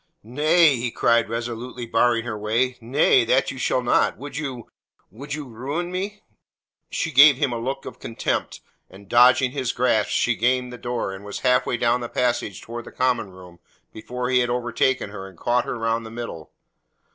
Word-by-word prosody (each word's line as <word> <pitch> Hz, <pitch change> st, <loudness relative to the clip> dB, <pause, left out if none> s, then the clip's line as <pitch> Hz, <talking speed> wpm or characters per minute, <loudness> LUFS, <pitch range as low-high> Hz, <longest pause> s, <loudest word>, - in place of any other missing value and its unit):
"Nay," 150 Hz, +5 st, +3 dB
he 120 Hz, +1 st, -2 dB
cried, 115 Hz, -1 st, +2 dB
resolutely 120 Hz, +1 st, -5 dB
barring 115 Hz, 0 st, +2 dB
her 120 Hz, -3 st, -4 dB
way. 115 Hz, +5 st, 0 dB
"Nay. 125 Hz, +1 st, +3 dB
That 130 Hz, +4 st, +2 dB
you 135 Hz, -, -9 dB
shall 125 Hz, 0 st, 0 dB
not. 120 Hz, -, +2 dB
Would 140 Hz, 0 st, -9 dB
you 130 Hz, -6 st, -5 dB, 0.4 s
would 140 Hz, +8 st, -6 dB
you 150 Hz, -2 st, -7 dB
ruin 140 Hz, +10 st, -4 dB
me?" 200 Hz, +3 st, -4 dB, 0.7 s
She 165 Hz, -, -2 dB
gave 140 Hz, 0 st, +7 dB
him 140 Hz, -3 st, 0 dB
a 115 Hz, -, -3 dB
look 135 Hz, +3 st, -4 dB
of -, -, -9 dB
contempt, 115 Hz, -, -3 dB, 0.3 s
and 95 Hz, +1 st, -15 dB
dodging 125 Hz, +4 st, +5 dB
his 130 Hz, -3 st, -2 dB
grasp 115 Hz, -4 st, +1 dB
she 120 Hz, -, +1 dB
gained 125 Hz, +2 st, 0 dB
the 125 Hz, -, -9 dB
door 120 Hz, -5 st, -3 dB
and 95 Hz, +1 st, -9 dB
was 105 Hz, -1 st, -7 dB
half 125 Hz, 0 st, +2 dB
way 120 Hz, -, 0 dB
down 120 Hz, +1 st, +1 dB
the 120 Hz, -, -5 dB
passage 120 Hz, -6 st, -1 dB
towards 120 Hz, 0 st, -7 dB
the -, -, -10 dB
common 125 Hz, -5 st, 0 dB
room 90 Hz, -2 st, -14 dB, 0.3 s
before 125 Hz, +3 st, -4 dB
he 125 Hz, -, +4 dB
had 120 Hz, -1 st, +1 dB
overtaken 120 Hz, -1 st, 0 dB
her 95 Hz, -2 st, -8 dB
and 95 Hz, -3 st, -15 dB
caught 120 Hz, +7 st, +1 dB
her -, -, -4 dB
round 115 Hz, 0 st, -1 dB
the 110 Hz, -, -8 dB
middle. 115 Hz, -9 st, -7 dB
120 Hz, 190 wpm, -23 LUFS, 115-130 Hz, 0.7 s, gave